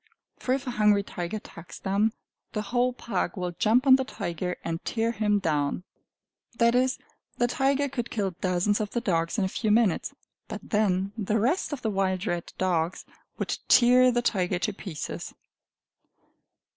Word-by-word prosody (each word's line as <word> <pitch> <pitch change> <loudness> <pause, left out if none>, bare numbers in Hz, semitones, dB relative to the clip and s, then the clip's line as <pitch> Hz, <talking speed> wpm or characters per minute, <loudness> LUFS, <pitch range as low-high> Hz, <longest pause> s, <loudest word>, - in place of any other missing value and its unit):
For 255 - +1
if 275 +1 -5
a 250 - -2
hungry 210 -3 +3
tiger 175 +1 -4
attacks 170 -5 -11
them, 205 +3 +1 0.4
the 210 - -2
whole 245 +4 +1
pack 205 -7 -3
will 180 -1 -2
jump 225 +9 +2
on 265 -1 +8
the 265 - -1
tiger 180 -6 -4
and 165 0 -3
tear 230 0 0
him 210 -2 +1
down 150 -3 0 0.7
that 235 0 +4
is, 255 +1 +2 0.4
the 240 - +3
tiger 270 +3 +1
could 245 -3 -4
kill 200 -4 -1
dozens 185 +3 0
of 210 - -2
the 240 - -1
dogs 170 -4 0
in 205 - +2
a - - +2
few 215 +3 -2
minutes, 210 -4 +2 0.3
but - - -6
then 200 -2 +1
the 215 0 0
rest 275 - +1
of 285 -4 -5
the 220 - 0
wild 190 -1 0
red 175 -5 -3
dogs 175 -1 0 0.3
would - - -2
tear 250 +1 +6
the 240 0 0
tiger 185 -5 +1
to 210 +3 -1
pieces. 185 -6 -6
210 Hz, 170 wpm, -27 LUFS, 185-240 Hz, 0.7 s, on